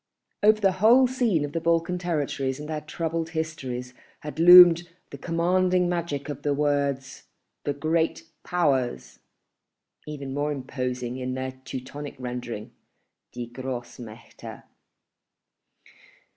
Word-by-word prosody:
Over 215 +1 +5
the 195 -2 +3
whole 240 +5 +7
scene 240 - +1
of 145 - -7
the 165 - -3
Balkan 170 +2 +1
territories 145 -6 -2
and 150 - -7
their 155 -1 -4
troubled 165 +1 -3
histories 130 -6 -4 0.3
had 150 +1 -7
loomed 175 0 +9 0.2
the - - -7
commanding 180 +2 +1
magic 170 -5 -3
of 145 -1 -6
the 145 -1 0
words 140 -2 -1 0.4
"the 145 - 0
Great 160 +3 0 0.2
Powers"—even 135 - -4
more 145 +1 -1
imposing 125 -2 -4
in 130 0 -4
their 130 0 -3
Teutonic 130 +2 -8
rendering, 120 -3 -6 0.6
"Die 120 0 -6
Grossmächte." 120 -3 -8
145 Hz, 115 wpm, -25 LUFS, 130-170 Hz, 0.6 s, loomed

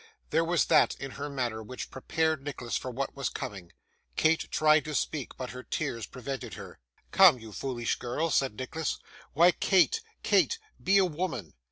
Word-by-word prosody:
There 165 - +3
was 165 -6 +2
that - - +4
in 135 0 -5
her 145 +2 -5
manner 120 -5 -2
which 125 +4 -7
prepared 160 +2 -1
Nicholas 130 -4 -4
for 130 - -2
what 135 +2 -4
was 140 -2 -1
coming. 95 -4 -7 0.4
Kate 160 +1 +2
tried 155 0 +4
to 155 -1 -4
speak, 145 -3 -2
but 130 -1 -5
her 125 - -7
tears 120 -6 -3
prevented 135 +1 -6
her. - - -10 0.3
'Come, - - +7
you 110 -2 -11
foolish 120 -2 -2
girl,' 150 +7 -1
said 135 -6 +1
Nicholas; 150 +6 -3 0.4
'why, 170 +5 +6
Kate, 195 - +3 0.2
Kate, 460 - +3 0.3
be 195 +1 +5
a 195 - +5
woman! 155 - -3
135 Hz, 175 wpm, -29 LUFS, 125-160 Hz, 0.4 s, Come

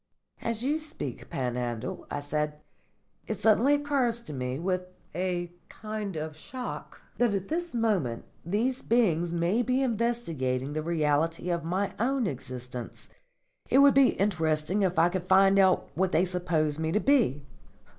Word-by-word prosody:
"As 230 0 -2
you 295 +4 +1
speak, 300 - -6
Panhandle," 120 -3 -3
I 145 - -3
said, 150 +1 -2 0.7
"it - - -2
suddenly 230 +6 +4
occurs 275 -5 0
to 150 - -7
me, 125 -1 -3
with 185 +3 -1 0.3
a 175 0 -2 0.2
kind 215 -3 -5
of 155 0 -4
shock, 245 +10 -7 0.2
that 240 -4 +3
at 195 -1 -3
this 340 -3 -2
moment 195 - 0 0.2
these 230 +9 0
beings 175 -8 +2
may 175 +7 +1
be 255 +2 +1
investigating 165 - -1
the 155 - -1
reality 165 +1 0
of 170 -2 -1
my 185 +4 -1
own 260 +2 +1
existence. 125 - -6 0.6
It - - +4
would 280 0 +7
be 275 -2 +5
interesting 170 -1 0
if 185 -3 +1
I 165 +1 +6
could 180 0 -4
find 195 +1 +5
out 190 -1 +3
what 185 +1 0
they 175 - +4
suppose 165 -4 0
me 160 0 -1
to 210 - +3
be." 220 - +2
180 Hz, 155 wpm, -28 LUFS, 155-230 Hz, 0.7 s, would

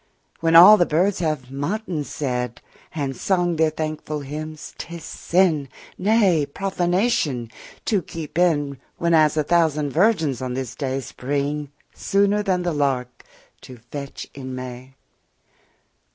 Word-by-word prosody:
When 165 0 +2
all 190 +6 +10
the 175 - +3
birds 180 +5 +1
have 155 -6 -2
matins 160 +2 -3
said 125 -5 -2 0.4
10 150 - -1
And 135 -1 -3
sung 175 +3 0
their 160 0 +3
thankful 155 -1 -4
hymns, 155 +2 -7
'tis 170 -1 -7
sin, 160 -5 +1 0.3
Nay, 190 -7 +3
profanation, 175 - 0 0.3
to 205 -4 +1
keep 160 -2 -8
in, 145 -6 +1 0.2
Whereas 160 -3 +3
a 155 - +3
thousand 155 -3 +2
virgins 160 - +2
on 125 -1 -3
this 130 -2 -4
day 135 -1 -3
Spring 145 +3 -3 0.2
sooner 200 +1 +1
than 185 -3 0
the 175 -1 -1
lark, 130 -4 -1 0.4
to 130 - -11
fetch 140 -2 -6
in 130 -2 -7
May. 130 +1 -8
155 Hz, 135 wpm, -22 LUFS, 135-175 Hz, 0.4 s, all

